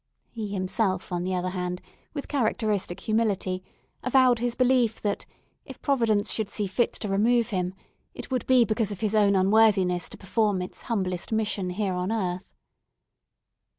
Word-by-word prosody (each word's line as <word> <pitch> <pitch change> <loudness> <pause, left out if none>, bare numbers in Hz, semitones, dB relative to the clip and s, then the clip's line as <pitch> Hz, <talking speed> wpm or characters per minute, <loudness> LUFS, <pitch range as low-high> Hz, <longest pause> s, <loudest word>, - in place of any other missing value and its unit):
He 220 -3 -4
himself, 190 -1 -1
on 175 0 -1
the 185 +1 -1
other 180 0 -1
hand, 180 -1 -3 0.4
with 285 - -4
characteristic 215 -8 0
humility, 200 -4 0 0.4
avowed 255 -1 +4
his 240 0 -1
belief 250 -3 +2
that 205 -1 -2 0.4
if - - -11
Providence 230 -7 +1
should 215 -3 -2
see 210 - -2
fit 195 +5 +1
to 210 - -5
remove 230 +4 +2
him, 185 -3 -2 0.4
it - - -8
would 255 -2 -1
be 255 -2 +5
because 215 -1 0
of 200 - -6
his 215 -1 0
own 205 -2 +4
unworthiness 190 -3 +3
to - - -10
perform 205 0 0
its 180 - -6
humblest 185 -5 -2
mission 215 -4 -1
here 190 +1 -1
on 180 +3 -2
earth. 185 - -3
205 Hz, 160 wpm, -26 LUFS, 185-230 Hz, 0.4 s, be